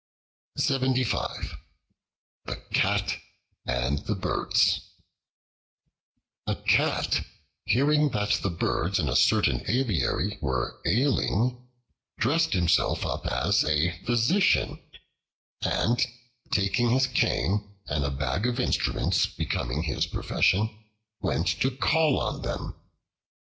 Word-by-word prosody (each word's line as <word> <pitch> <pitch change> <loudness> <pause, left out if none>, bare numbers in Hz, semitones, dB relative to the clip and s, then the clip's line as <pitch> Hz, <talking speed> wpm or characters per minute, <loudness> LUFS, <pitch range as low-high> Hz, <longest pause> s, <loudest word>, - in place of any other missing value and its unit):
The 130 -3 0 1.2
Cat - - +1 0.5
and 60 +4 0
the 105 - -3
Birds 95 - +1 1.7
A - - 0
CAT, - - +1 0.4
hearing 145 +7 +3
that 105 -4 0
the 100 - 0
Birds 85 -1 -1
in - - 0
a - - -1
certain - - +3
aviary 110 -4 0
were 65 -4 -2
ailing 125 - +1 0.5
dressed 160 +8 +2
himself 85 -2 +2
up - - -3
as - - +2
a 75 +3 +1
physician, 120 - +2 0.8
and, 120 +2 +1 0.5
taking 100 +5 +1
his 130 +3 +3
cane 105 -5 0
and 70 -2 -1
a 70 - 0
bag 70 - -1
of 125 +1 -2
instruments 125 - +1
becoming 65 +6 -3
his 70 -7 -1
profession, 110 +3 0 0.4
went 90 -3 0 0.2
to 130 - +3
call 150 +3 +2
on - - -3
them. - - -4
110 Hz, 100 wpm, -27 LUFS, 85-130 Hz, 1.7 s, hearing